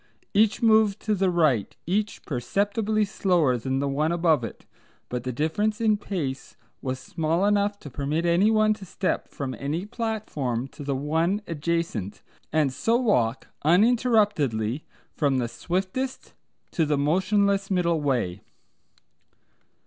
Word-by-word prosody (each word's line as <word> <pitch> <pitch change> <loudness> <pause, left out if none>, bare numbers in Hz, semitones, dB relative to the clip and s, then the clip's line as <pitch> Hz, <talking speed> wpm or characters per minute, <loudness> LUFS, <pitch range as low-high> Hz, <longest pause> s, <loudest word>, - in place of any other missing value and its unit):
Each 215 +2 +3
moved 220 -2 +4
to 215 - 0
the 190 -2 +2
right, 155 - +1
each 205 +5 -1
perceptibly 205 - 0
slower 180 -9 +2
than 130 +3 -2
the 140 +1 0
one 150 +4 0
above 165 -6 +2
it, - - -7 0.4
but 125 0 -3
the 130 +1 -3
difference 185 - 0
in 220 -2 +3
pace 150 -10 -4 0.3
was 130 -1 -2
small 165 +7 -1
enough 205 0 +2
to 145 - -8
permit 150 +6 -1
anyone 215 +5 +4
to 210 -2 -11
step 190 +1 -2
from 135 -2 -5
any 155 +7 -2
platform 210 - -3
to 145 - -10
the 140 -1 -1
one 165 +9 0
adjacent, 165 - -3 0.3
and 150 -4 +2
so 225 - +1
walk 130 - +1
uninterruptedly 175 - +2 0.3
from 140 -3 +1
the 120 -2 0
swiftest 185 - -3 0.4
to 160 -3 +1
the 150 -1 +1
motionless 195 +6 +2
middle 170 -4 +1
way. 120 -10 -1
170 Hz, 135 wpm, -25 LUFS, 140-205 Hz, 0.4 s, moved